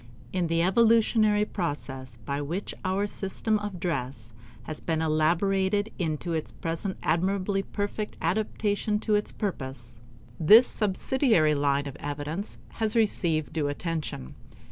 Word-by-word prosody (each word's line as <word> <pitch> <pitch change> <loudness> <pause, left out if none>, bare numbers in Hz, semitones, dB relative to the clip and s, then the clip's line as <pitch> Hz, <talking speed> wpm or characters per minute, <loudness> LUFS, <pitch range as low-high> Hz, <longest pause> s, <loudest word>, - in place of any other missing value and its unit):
In 180 -2 +1
the 165 0 +2
evolutionary 215 +1 +4
process 135 - -4
by 140 +2 -2
which 170 +8 -3
our 190 +2 0
system 205 +2 -1
of 205 -3 -5
dress 125 - -3 0.3
has 155 - -6
been 160 -2 -1
elaborated 190 +6 +1
into 165 0 -2
its 160 -1 -2
present 165 +4 -4
admirably 190 +4 +1
perfect 205 +1 -4
adaptation 210 +3 0
to 215 - 0
its 210 0 +1
purpose, 130 - -5 0.4
this 215 +10 +8
subsidiary 210 - +2
line 140 -1 +1
of 140 - -7
evidence 145 +7 -4 0.2
has 220 -1 +1
received 170 -9 +2
due 155 -3 0
attention. 145 - -4
175 Hz, 125 wpm, -27 LUFS, 150-205 Hz, 0.4 s, this